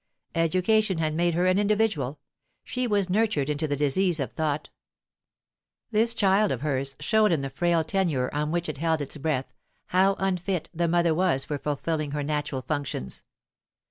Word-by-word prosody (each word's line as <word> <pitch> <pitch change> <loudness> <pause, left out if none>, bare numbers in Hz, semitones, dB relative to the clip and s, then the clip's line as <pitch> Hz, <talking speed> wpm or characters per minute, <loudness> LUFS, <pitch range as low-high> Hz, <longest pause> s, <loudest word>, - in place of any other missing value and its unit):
Education 185 +4 +2
had 155 -1 0
made 170 +1 +1
her 175 +1 +2
an 185 +1 +3
individual; 205 - 0 0.4
she 250 0 -2
was 205 -4 +1
nurtured 185 -8 +1
into 150 +2 -1
the 145 - -1
disease 155 +5 +2
of 135 - -2
thought 155 -2 -2 1.2
This 225 +2 +2
child 200 0 +3
of 130 - -2
hers 135 -2 -2
showed 220 -2 +3
in 160 -4 +1
the 135 -1 -4
frail 170 +3 +1
tenure 160 -8 0
on 150 +1 -1
which 170 +1 -1
it 155 -2 -4
held 160 0 0
its 145 +1 -5
breath 140 -3 -2 0.4
how 190 +2 +3
unfit 185 -2 -1
the 170 0 0
mother 170 -1 +3
was 170 -5 +1
for 145 -2 -3
fulfilling 150 +1 -2
her 145 -1 -2
natural 145 -3 -2
functions. 145 - -4
165 Hz, 170 wpm, -26 LUFS, 145-190 Hz, 1.2 s, an